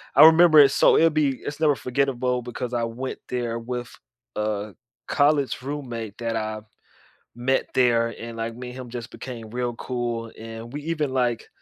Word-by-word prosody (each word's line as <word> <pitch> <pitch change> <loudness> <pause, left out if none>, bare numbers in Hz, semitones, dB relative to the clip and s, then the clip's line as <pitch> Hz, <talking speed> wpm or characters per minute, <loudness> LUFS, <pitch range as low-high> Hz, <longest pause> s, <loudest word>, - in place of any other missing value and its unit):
I - - +10
remember 160 -1 +8
it 140 -2 +8
so - - +5
it'll 165 - +6
be 150 -4 +1
it's 145 +1 -5
never 150 -3 +4
forgettable 125 0 0
because 120 0 -5
I 120 -1 0
went 125 +3 -5
there 120 -2 -2
with 120 0 -5 0.4
a 105 -1 -2 0.3
college 145 -2 +2
roommate 120 -6 -5
that 115 -1 -2
I 110 0 -3 0.7
met 130 +2 0
there 120 -2 +3
and, 115 0 -7
like, 115 0 -3
me 125 +1 -7
and 125 - -9
him 125 -2 -8
just 120 -1 -7
became 115 -4 -8
real 120 +1 -3
cool 120 -2 -3
and 115 +1 -8
we 145 - -4
even, 155 -3 -1
like 125 -3 0
125 Hz, 175 wpm, -24 LUFS, 115-135 Hz, 0.7 s, I